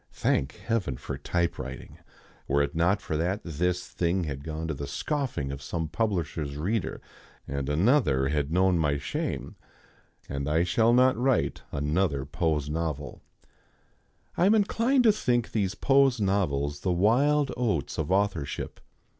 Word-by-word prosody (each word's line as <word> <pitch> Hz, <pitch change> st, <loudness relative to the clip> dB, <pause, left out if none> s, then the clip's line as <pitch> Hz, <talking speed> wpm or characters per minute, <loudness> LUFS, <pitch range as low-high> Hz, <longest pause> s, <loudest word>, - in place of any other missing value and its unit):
(Thank 70 Hz, +2 st, 0 dB
Heaven 100 Hz, -, -2 dB
for -, -, -5 dB
typewriting! 85 Hz, -1 st, -3 dB, 0.5 s
Were 70 Hz, +1 st, +3 dB
it 70 Hz, -, -3 dB
not 90 Hz, +5 st, +1 dB
for 80 Hz, -, -3 dB
that, 90 Hz, +6 st, -1 dB
this 90 Hz, +2 st, -1 dB
thing 90 Hz, +1 st, 0 dB
had 70 Hz, -3 st, -5 dB
gone 80 Hz, +1 st, -4 dB
to 80 Hz, -, -1 dB
the 70 Hz, 0 st, -5 dB
scoffing 125 Hz, -, -2 dB
of 70 Hz, 0 st, -6 dB
some 80 Hz, +3 st, -3 dB
publisher's 80 Hz, -6 st, -2 dB
reader, 95 Hz, +6 st, -2 dB, 0.5 s
and 70 Hz, 0 st, -3 dB
another 75 Hz, -, +3 dB
had 75 Hz, 0 st, -1 dB
known 90 Hz, 0 st, +3 dB
my 75 Hz, -2 st, +1 dB
shame.) 70 Hz, -, -4 dB, 0.7 s
And 70 Hz, 0 st, -3 dB
I 80 Hz, +3 st, +3 dB
shall 110 Hz, +6 st, +3 dB
not 130 Hz, +2 st, +5 dB
write 130 Hz, +3 st, +1 dB
another 75 Hz, -1 st, 0 dB
pose 75 Hz, -1 st, -1 dB
novel. 75 Hz, -2 st, -3 dB, 1.1 s
I 180 Hz, -, +3 dB
am 215 Hz, -, +5 dB
inclined 230 Hz, +5 st, +2 dB
to 225 Hz, -, +7 dB
think 120 Hz, -, 0 dB
these 100 Hz, -3 st, 0 dB
pose 135 Hz, 0 st, +3 dB
novels 75 Hz, -8 st, 0 dB
the 95 Hz, -, -1 dB
wild 130 Hz, +10 st, +3 dB
oats 110 Hz, -, -1 dB
of 80 Hz, +2 st, -2 dB
authorship. 95 Hz, -7 st, -1 dB
85 Hz, 145 wpm, -27 LUFS, 75-115 Hz, 1.1 s, to